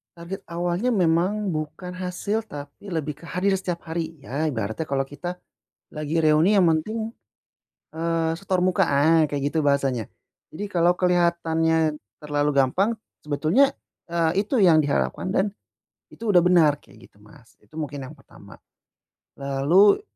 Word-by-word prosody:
target 175 +3 -7
awalnya 175 +8 -1
memang 185 +3 +1
bukan 155 +3 -5
hasil, 185 +4 -3
tapi 145 +1 -10
lebih 155 -5 -4
ke - - -13
hadir 180 +5 0
setiap 175 -2 -4
hari. 165 0 -4
Ya, 145 +4 -2
ibaratnya 115 +2 -3
kalau 135 -1 0
kita 175 +6 -6 0.6
lagi 155 +1 -2
reuni 155 +6 +4
yang 195 - +5
penting, 220 +8 -2 0.8
eee, 165 0 0
setor 190 -2 -1
muka, 185 +1 +3
ah, 155 +3 +4
kayak 145 -1 -3
gitu 160 - 0
bahasanya. 135 -6 +1 0.5
Jadi 205 - -4
kalau 175 -1 +3
kelihatannya 165 -3 +1 0.2
terlalu 145 0 0
gampang, 180 - +2 0.3
sebetulnya, 160 - +2 0.4
eee, 170 +3 +1
itu 270 - -1
yang 165 -4 +6
diharapkan 145 +5 -1
dan 200 +1 +1 0.6
itu 225 -2 -4
udah 175 - +7
benar, 165 -5 +4
kayak 115 +2 -17
gitu, - - -27
Mas, 110 +2 -19
itu - - -25
mungkin 145 -2 -4
yang - - -11
pertama. - - -16 0.8
Lalu 145 - +4
165 Hz, 145 wpm, -24 LUFS, 150-185 Hz, 0.8 s, udah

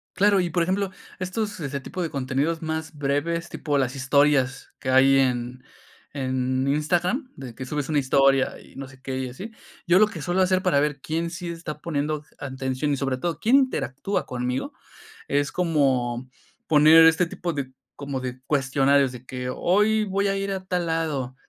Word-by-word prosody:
Claro, 200 0 +4
y 175 - -1
por 175 0 +1
ejemplo, 190 +2 -1 0.3
estos 205 +2 -3
ese 140 -2 -3
tipo 180 +7 -6
de 170 - -1
contenidos 140 +4 -1
más 160 -1 -4
breves, 145 +5 -1
tipo 145 -2 -2
las 130 -1 0
historias 135 -1 +2
que 130 - -4
hay 135 +1 +5
en 125 -1 -1 0.5
en 130 -1 -1
Instagram, 175 - 0
de 130 -3 -9
que 130 +3 -7
subes 145 0 -3
una 150 -2 +2
historia 135 0 +2
y - - -18
no 135 0 -7
sé 135 0 -16
qué 130 0 -4
y 130 -1 -3
así, 190 - -8 0.3
yo 180 0 +5
lo 215 - +6
que 175 -8 -7
suelo 180 +1 +1
hacer 185 0 +2
para 175 -6 +3
ver 145 -1 0
quién 165 +3 -2
sí 170 +1 -6
está 165 -3 -6
poniendo 150 -1 -2 0.2
atención 130 +1 -3
y, 140 - 0
sobre 135 -1 -1
todo, 165 +1 -2
quién 235 +9 +4
interactúa 205 - -1
conmigo, 125 +1 -3 0.5
es 145 0 0
como 130 -8 0 0.4
poner 155 +2 +7
este 165 +2 +4
tipo 170 +1 -4
de 135 -3 -5 0.2
como 140 -2 -5
de 125 0 -6
cuestionarios, 140 -1 +2
de 125 -1 -10
que: 125 -1 -5
"Hoy 210 +4 +2
voy 200 0 0
a 195 - 0
ir 195 0 -2
a 190 -1 -4
tal 180 -2 -1
lado, 150 -6 -2
145 Hz, 185 wpm, -24 LUFS, 135-175 Hz, 0.5 s, poner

